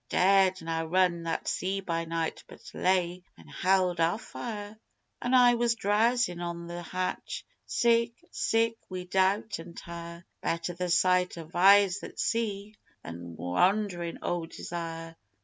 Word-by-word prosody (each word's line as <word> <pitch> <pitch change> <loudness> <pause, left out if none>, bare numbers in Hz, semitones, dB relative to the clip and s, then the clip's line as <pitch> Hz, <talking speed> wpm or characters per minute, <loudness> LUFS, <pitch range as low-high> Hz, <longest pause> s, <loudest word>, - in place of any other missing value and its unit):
We - - 0
dared 190 -1 +4
na 165 0 -1
run 175 +1 +2
that 165 - -2
sea 190 +2 -1
by 165 -3 -2
night 165 0 -3
but - - -13
lay 180 -1 +1 0.2
an' 80 -2 -16
held 185 - +1
our 165 +4 +2
fire, 215 -3 -7 0.5
An' 245 +1 +2
I 245 -1 +7
was 235 -1 +2
drowzin' 215 -2 +2
on 170 0 -4
the 175 0 -6
hatch 185 +2 -4 0.2
sick 235 -1 +2 0.2
sick 225 0 +1
wi' 185 -1 -5
doubt 190 +3 +1
an' 170 +1 -10
tire: 170 +1 -8 0.2
"_Better 170 +1 -2
the 180 +1 -2
sight 180 +1 +3
of 165 0 -10
eyes 195 +1 +6
that - - -10
see 210 -2 -1 0.3
than 85 0 -8
wanderin' 175 - 0
o' 175 -2 -2
desire! 165 -1 -6
180 Hz, 150 wpm, -29 LUFS, 170-205 Hz, 0.5 s, I